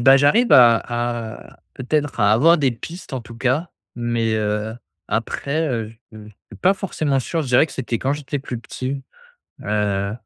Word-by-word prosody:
bah, 135 Hz, +3 st, +7 dB
j'arrive 200 Hz, -, +4 dB
à 120 Hz, -2 st, +8 dB, 0.8 s
à -, -, -33 dB
peut-être 145 Hz, +2 st, -2 dB
à 105 Hz, +1 st, +4 dB
avoir 165 Hz, +9 st, +5 dB
des 135 Hz, -4 st, +2 dB
pistes, 165 Hz, +7 st, -9 dB
en 130 Hz, -, -2 dB
tout 115 Hz, 0 st, -12 dB
cas, 135 Hz, +8 st, 0 dB, 0.3 s
mais, 120 Hz, -2 st, -1 dB
heu, 105 Hz, +1 st, -1 dB, 0.3 s
après, 155 Hz, +3 st, -1 dB
heu, 115 Hz, -4 st, -2 dB, 0.2 s
je, 110 Hz, -, -13 dB
heu, 105 Hz, -, -11 dB
je 105 Hz, -, -17 dB
suis 105 Hz, -, -12 dB
pas 190 Hz, +2 st, +4 dB
forcément 155 Hz, -8 st, -1 dB
sûr. 165 Hz, +5 st, -2 dB
Je -, -, -6 dB
dirais 125 Hz, +6 st, +5 dB
que -, -, -13 dB
c'était 120 Hz, -3 st, -3 dB
quand 135 Hz, +2 st, 0 dB
j'étais 145 Hz, -1 st, -4 dB
plus 125 Hz, -4 st, -5 dB
petit. 130 Hz, +3 st, -5 dB, 0.6 s
Heu, 105 Hz, -1 st, 0 dB
130 Hz, 185 wpm, -21 LUFS, 115-145 Hz, 0.8 s, à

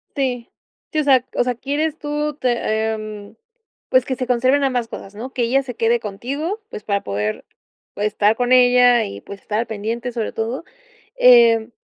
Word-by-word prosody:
Sí, 250 Hz, -4 st, -2 dB, 0.4 s
sí, 310 Hz, -, 0 dB
o -, -, +2 dB
sea 260 Hz, -3 st, +4 dB
o -, -, +3 dB
sea, 250 Hz, -1 st, -1 dB
quieres 290 Hz, +5 st, -2 dB
tú 295 Hz, -1 st, -3 dB
te 235 Hz, -4 st, 0 dB
em, 215 Hz, -1 st, -8 dB, 0.5 s
pues 255 Hz, -1 st, +4 dB
que 260 Hz, -, -2 dB
se 255 Hz, -1 st, -4 dB
conserven 255 Hz, +3 st, +2 dB
ambas 250 Hz, -4 st, 0 dB
cosas, 195 Hz, -2 st, -9 dB
¿no?, 250 Hz, +5 st, -7 dB
que 245 Hz, -, -1 dB
ella 270 Hz, +4 st, +2 dB
se 250 Hz, -3 st, -7 dB
quede 230 Hz, +1 st, +2 dB
contigo, 280 Hz, -, -4 dB
pues 210 Hz, -, -8 dB
para 200 Hz, -1 st, -1 dB
poder 105 Hz, +2 st, -3 dB, 0.5 s
estar 210 Hz, +1 st, +1 dB
con 245 Hz, +1 st, -1 dB
ella 245 Hz, -1 st, +5 dB
y 100 Hz, 0 st, -8 dB
pues 200 Hz, -, -10 dB
estar 220 Hz, +2 st, -2 dB
pendiente, 225 Hz, +3 st, -4 dB
sobre 230 Hz, -2 st, -3 dB
todo, 230 Hz, +8 st, -3 dB, 0.5 s
em, 235 Hz, -, +6 dB
240 Hz, 175 wpm, -20 LUFS, 220-260 Hz, 0.5 s, em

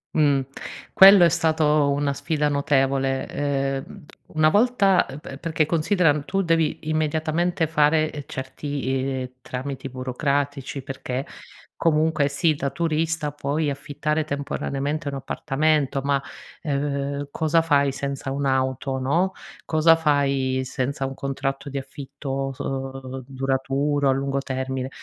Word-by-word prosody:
Mh, 145 Hz, -3 st, +4 dB, 0.5 s
quello 195 Hz, -1 st, +9 dB
è -, -, +5 dB
stato 155 Hz, -3 st, +2 dB
una 140 Hz, 0 st, 0 dB
sfida 150 Hz, +1 st, -1 dB
notevole, 135 Hz, -2 st, +1 dB
ehm, 140 Hz, +4 st, -3 dB, 0.3 s
una 155 Hz, 0 st, +5 dB
volta 205 Hz, -4 st, +3 dB
eh -, -, -8 dB
pe 140 Hz, -3 st, -9 dB
perché 160 Hz, -1 st, 0 dB
considera, 165 Hz, +1 st, +2 dB
uhm, 145 Hz, 0 st, -2 dB
tu 195 Hz, 0 st, 0 dB
devi 165 Hz, -2 st, +1 dB
immediatamente 160 Hz, +2 st, 0 dB
fare, 155 Hz, 0 st, +2 dB
ehm, 145 Hz, -, -6 dB
certi, 140 Hz, +2 st, -5 dB, 0.4 s
ehm, 125 Hz, -, -5 dB
tramiti 135 Hz, +1 st, -5 dB
burocratici, 135 Hz, +2 st, -2 dB
perché 130 Hz, 0 st, -4 dB, 0.5 s
comunque, 155 Hz, -2 st, +2 dB
sì, 155 Hz, +3 st, +2 dB
da 140 Hz, -1 st, -2 dB
turista 160 Hz, -1 st, -1 dB
puoi 145 Hz, +1 st, -1 dB
affittare 150 Hz, +2 st, -2 dB
temporaneamente 145 Hz, +1 st, -3 dB
un 140 Hz, -, -5 dB
appartamento 140 Hz, +1 st, 0 dB
ma, 140 Hz, 0 st, +1 dB, 0.4 s
ehm, 140 Hz, -1 st, -2 dB
cosa 160 Hz, +1 st, +2 dB
fai 140 Hz, -3 st, +3 dB
senza 140 Hz, 0 st, -4 dB
un'auto, 130 Hz, -1 st, 0 dB
no, 170 Hz, +9 st, +1 dB, 0.3 s
cosa 160 Hz, +1 st, +5 dB
fai 140 Hz, -4 st, +1 dB
senza 130 Hz, +1 st, -2 dB
un 135 Hz, -, -7 dB
contratto 135 Hz, +1 st, -3 dB
di 140 Hz, 0 st, -3 dB
affitto, 135 Hz, 0 st, -5 dB
s 130 Hz, -, -20 dB
uhm, 135 Hz, -1 st, -5 dB
duraturo, 135 Hz, +2 st, 0 dB
a -, -, +5 dB
lungo 135 Hz, +1 st, -1 dB
termine, 130 Hz, -1 st, -3 dB
140 Hz, 130 wpm, -24 LUFS, 135-155 Hz, 0.5 s, quello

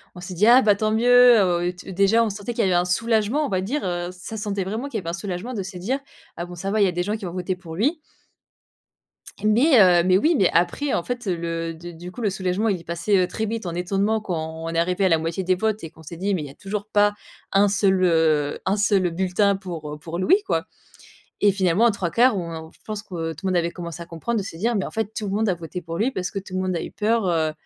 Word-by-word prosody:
on 180 Hz, -, -9 dB
s'est 185 Hz, +1 st, -7 dB
dit: 205 Hz, +6 st, +3 dB
«Ah 250 Hz, +2 st, +8 dB
bah 210 Hz, -3 st, +4 dB
tant 215 Hz, +1 st, 0 dB
mieux!» 245 Hz, +1 st, +6 dB
heu, 175 Hz, -2 st, +2 dB
o -, -, -2 dB
t 180 Hz, +1 st, -11 dB
déjà 200 Hz, +5 st, +3 dB
on 220 Hz, -, 0 dB
sentait 205 Hz, +4 st, -5 dB
qu'il -, -, 0 dB
y 195 Hz, -, +2 dB
avait 185 Hz, -, +2 dB
un 175 Hz, +1 st, +2 dB
soulagement, 225 Hz, -, +1 dB
on -, -, -3 dB
va 185 Hz, -, 0 dB
dire, 270 Hz, +10 st, -2 dB
heu, 175 Hz, -1 st, -2 dB
ça 185 Hz, +5 st, -8 dB
se 210 Hz, -, -4 dB
sentait 200 Hz, -2 st, -2 dB
vraiment 220 Hz, +9 st, -4 dB
qu'il 240 Hz, -6 st, -4 dB
y -, -, -7 dB
avait 165 Hz, -, -5 dB
un -, -, -3 dB
soulagement 195 Hz, +5 st, -5 dB
de 205 Hz, -5 st, -3 dB
se 185 Hz, 0 st, -8 dB
dire: 245 Hz, +10 st, -2 dB, 0.4 s
«Ah 170 Hz, -, -3 dB
bon, 175 Hz, 0 st, -10 dB
ça 195 Hz, +3 st, -4 dB
va, 215 Hz, -, +1 dB
il -, -, +6 dB
y -, -, +3 dB
a -, -, 0 dB
des 175 Hz, -, -1 dB
gens 210 Hz, +4 st, -2 dB
qui 205 Hz, -, -8 dB
ont 175 Hz, -, -5 dB
voté 185 Hz, 0 st, -2 dB
pour 170 Hz, -3 st, -9 dB
lui». 285 Hz, -, +1 dB, 1.4 s
Mais, 240 Hz, +5 st, +5 dB
heu, 175 Hz, -2 st, +6 dB
mais 185 Hz, +1 st, +4 dB
oui, 320 Hz, -, +3 dB
mais 190 Hz, -, +4 dB
après 220 Hz, +12 st, +1 dB
en 170 Hz, -, 0 dB
fait, 245 Hz, +2 st, -4 dB
heu, 180 Hz, -, +1 dB
le 165 Hz, 0 st, -3 dB
de 175 Hz, +2 st, -9 dB
du 175 Hz, +2 st, -9 dB
coup 240 Hz, -, -9 dB
le 210 Hz, -, +1 dB
soulagement 190 Hz, +3 st, -1 dB
il 190 Hz, -4 st, 0 dB
est -, -, -14 dB
passé, 170 Hz, +4 st, 0 dB
heu, 180 Hz, -, +2 dB
très 220 Hz, -, -3 dB
vite 225 Hz, -1 st, -4 dB
en 170 Hz, -, -3 dB
étonnement 195 Hz, +5 st, 0 dB
quoi, 180 Hz, -5 st, -3 dB
on 160 Hz, +1 st, -5 dB
arrivait 180 Hz, +3 st, +1 dB
à -, -, +4 dB
la 165 Hz, -, +4 dB
moitié 165 Hz, +4 st, -3 dB
des 185 Hz, +1 st, +2 dB
votes 215 Hz, +1 st, -1 dB
et 165 Hz, -, -6 dB
qu'on 160 Hz, -, -17 dB
s'est 165 Hz, +2 st, -9 dB
dit 200 Hz, +3 st, -1 dB
mais 155 Hz, -, -3 dB
il -, -, -5 dB
y -, -, -10 dB
a -, -, -12 dB
toujours 200 Hz, +5 st, -5 dB
pas 205 Hz, -1 st, +3 dB, 0.4 s
1 200 Hz, +1 st, +4 dB
seul, 190 Hz, -1 st, +2 dB
heu 160 Hz, -4 st, +2 dB
1 190 Hz, +2 st, +2 dB
seul 200 Hz, -3 st, +2 dB
bulletin 190 Hz, +3 st, +1 dB
pour 170 Hz, -6 st, -6 dB
heu, -, -, -7 dB
pour 165 Hz, +3 st, -6 dB
Louis 380 Hz, -, +3 dB
quoi. -, -, 0 dB, 0.8 s
Et 205 Hz, -1 st, +5 dB
finalement 190 Hz, +3 st, +2 dB
au -, -, +5 dB
3/4 210 Hz, +4 st, +2 dB
on, 170 Hz, -2 st, -4 dB
heu 165 Hz, -, -5 dB
on 160 Hz, 0 st, -11 dB
je -, -, -25 dB
pense 215 Hz, -1 st, -5 dB
que 165 Hz, -5 st, -4 dB
tout 195 Hz, -, -7 dB
le -, -, +1 dB
monde 180 Hz, -, +1 dB
avait 170 Hz, 0 st, +1 dB
commencé 170 Hz, -1 st, -7 dB
à -, -, -10 dB
comprendre, 170 Hz, +8 st, -3 dB
de -, -, -5 dB
se 165 Hz, -, -8 dB
dire: 230 Hz, +7 st, 0 dB
«Mais 195 Hz, -, 0 dB
en -, -, -7 dB
fait 220 Hz, -1 st, -3 dB
tout 215 Hz, -, -3 dB
le -, -, -3 dB
monde 220 Hz, +1 st, +1 dB
a 185 Hz, -, +2 dB
voté 170 Hz, +1 st, -7 dB
pour 165 Hz, +1 st, -6 dB
lui 240 Hz, +5 st, +1 dB
parce 185 Hz, -5 st, -3 dB
que 200 Hz, -, -4 dB
tout 185 Hz, -1 st, -9 dB
le 185 Hz, -, 0 dB
monde 185 Hz, -1 st, -1 dB
a 165 Hz, -, -2 dB
eu -, -, -6 dB
peur, 220 Hz, 0 st, 0 dB
heu, 160 Hz, -2 st, +1 dB
190 Hz, 300 wpm, -23 LUFS, 175-215 Hz, 1.4 s, Ah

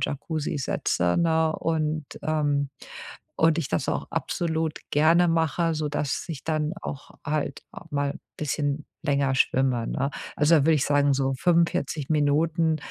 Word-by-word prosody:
Jacuzzi 150 Hz, +1 st, -2 dB
setze, 90 Hz, -9 st, 0 dB
ne, 160 Hz, -1 st, +3 dB
und, 155 Hz, -1 st, -1 dB, 0.2 s
ähm 145 Hz, -2 st, 0 dB, 0.7 s
und 160 Hz, 0 st, +4 dB
ich 160 Hz, -, -2 dB
das 85 Hz, -, -1 dB
auch -, -, -3 dB
absolut 160 Hz, -2 st, -1 dB
gerne 165 Hz, +4 st, +4 dB
mache, 165 Hz, 0 st, +1 dB
sodass 150 Hz, -2 st, -2 dB
ich 155 Hz, -5 st, -6 dB
dann 155 Hz, -1 st, -1 dB
auch 140 Hz, -, -6 dB
halt 145 Hz, -2 st, -2 dB
auch 165 Hz, -, -12 dB
mal 145 Hz, -1 st, -1 dB, 0.2 s
bisschen 145 Hz, 0 st, -2 dB, 0.2 s
länger 140 Hz, -3 st, +1 dB
schwimme, 130 Hz, -2 st, +2 dB
ne? 135 Hz, +1 st, -1 dB, 0.3 s
Also 150 Hz, +3 st, +4 dB
da -, -, +4 dB
würde 165 Hz, -, +5 dB
ich 145 Hz, -, +1 dB
sagen, 145 Hz, -1 st, +3 dB
so 135 Hz, 0 st, 0 dB
45 165 Hz, -2 st, +1 dB
Minuten, 155 Hz, +2 st, +2 dB
150 Hz, 145 wpm, -26 LUFS, 140-160 Hz, 0.7 s, würde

